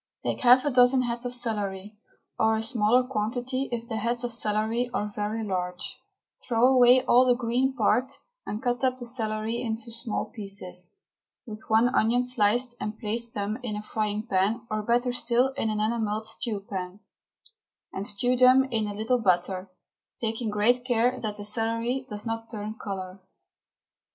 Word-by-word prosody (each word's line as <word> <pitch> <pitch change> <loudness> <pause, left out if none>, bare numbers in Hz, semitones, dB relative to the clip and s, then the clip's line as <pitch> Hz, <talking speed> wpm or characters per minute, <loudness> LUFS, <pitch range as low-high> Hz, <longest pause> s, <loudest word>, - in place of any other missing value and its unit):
Take - - -2
half 255 +1 +6
a 290 - +1
dozen 250 +1 +5
heads 240 0 -2
of - - -4
celery, 210 -4 -3 0.4
or 220 0 +3
a 220 - -2
smaller 235 +1 +3
quantity 250 +3 -2
if 235 -1 -3
the 225 - -3
heads 235 +3 -1
of 245 - -2
celery 225 +2 -1
are 210 -3 -2
very 215 +2 -2
large; 180 -3 -4 0.5
throw 240 0 +4
away 250 -1 +6
all 250 +1 +6
the 250 -1 +4
green 250 +2 0
part 250 +2 +2 0.4
and 215 +4 -4
cut 245 0 -1
up 255 -1 +2
the 245 - -7
celery 225 -1 -2
into 230 0 -3
small 230 -1 -3
pieces, 195 - -4 0.5
with 215 -1 -8
one 225 +2 +4
onion 235 +3 +3
sliced, 240 0 +1
and 210 +1 -4
place 235 +1 -3
them 210 +1 -3
in 230 -4 -4
a 210 - -5
frying 215 0 -2
pan, 215 +3 0
or, 215 0 0
better 245 +3 +1
still, 245 +2 +2
in 265 -5 -2
an 215 -1 -1
enamelled 215 -1 -1
stew 220 -2 -3
pan, 185 0 -5 0.9
and 195 +2 -2
stew 245 +5 +2
them 255 +1 +6
in 220 -2 0
a 205 - -5
little 225 +4 +1
butter, 185 -1 0 0.5
taking 225 0 -2
great 225 +4 +2
care 245 0 +1
that 215 -2 -3
the 205 - -7
celery 230 +4 -1
does 210 +1 -5
not 225 0 -4
turn 215 -1 -5
colour. 190 -2 -5
225 Hz, 170 wpm, -27 LUFS, 210-245 Hz, 0.9 s, half